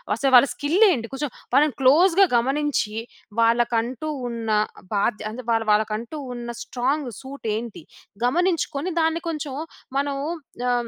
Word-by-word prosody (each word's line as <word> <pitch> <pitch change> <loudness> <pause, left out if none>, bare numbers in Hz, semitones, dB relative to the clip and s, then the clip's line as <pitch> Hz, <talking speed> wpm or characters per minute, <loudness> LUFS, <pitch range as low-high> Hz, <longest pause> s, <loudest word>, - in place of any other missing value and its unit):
అసలు 270 +3 +1
వాళ్ళ 250 +3 +8
స్కిల్ 320 +9 0
ఏంటి? 230 -7 -1
కొంచెం 285 +1 -2 0.2
వాళ్ళని 295 +1 +4
క్లోజ్‌గా 345 +8 +6
గమనించి 270 -3 0 0.5
వాళ్ళకంటూ 235 +4 +1 0.2
ఉన్న 230 -2 -4 0.5
బాధ్య 210 +1 0
అంటే 240 +4 -7
వా 230 - +4 0.2
వాళ్ళకంటూ 215 +6 0 0.2
ఉన్న 240 -1 -6
స్ట్రాంగ్ 260 +2 -1
సూట్ 270 -1 -10
ఏంటి? 225 -5 -6 0.4
గమనించుకొని 335 +1 0
దాన్ని 325 +1 +1
కొంచెం 300 -4 -4 0.4
మనం 280 0 0 0.5
ఆహ్, 240 -1 0
260 Hz, 125 wpm, -23 LUFS, 235-295 Hz, 0.5 s, వాళ్ళ